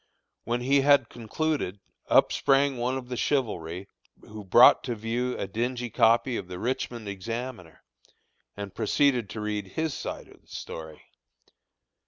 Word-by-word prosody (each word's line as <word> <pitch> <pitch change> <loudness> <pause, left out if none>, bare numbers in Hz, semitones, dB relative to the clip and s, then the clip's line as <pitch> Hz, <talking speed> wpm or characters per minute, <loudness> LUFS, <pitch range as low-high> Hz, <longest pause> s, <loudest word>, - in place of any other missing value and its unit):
When 120 +2 -1
he 135 +2 +3
had 140 -3 +4
concluded, 120 - -2 0.3
up - - +5
sprang 140 0 +2
one 125 +2 -1
of 130 -2 -7
the 125 - -4
chivalry, 100 - -2 0.3
who 105 0 -10
brought 110 +6 +7
to 120 -3 -2
view 120 +3 -2
a - - -2
dingy 120 +4 -3
copy 115 +2 +3
of 95 - -6
the 90 -1 -7
Richmond 120 0 -3
Examiner, 100 - -6 0.7
and 100 -1 -6
proceeded 120 0 +1
to 105 0 -6
read 105 -1 -3
his 160 -2 -2
side - - -6
of - - -19
the - - -34
story. 80 -1 -8
120 Hz, 150 wpm, -27 LUFS, 105-130 Hz, 0.7 s, brought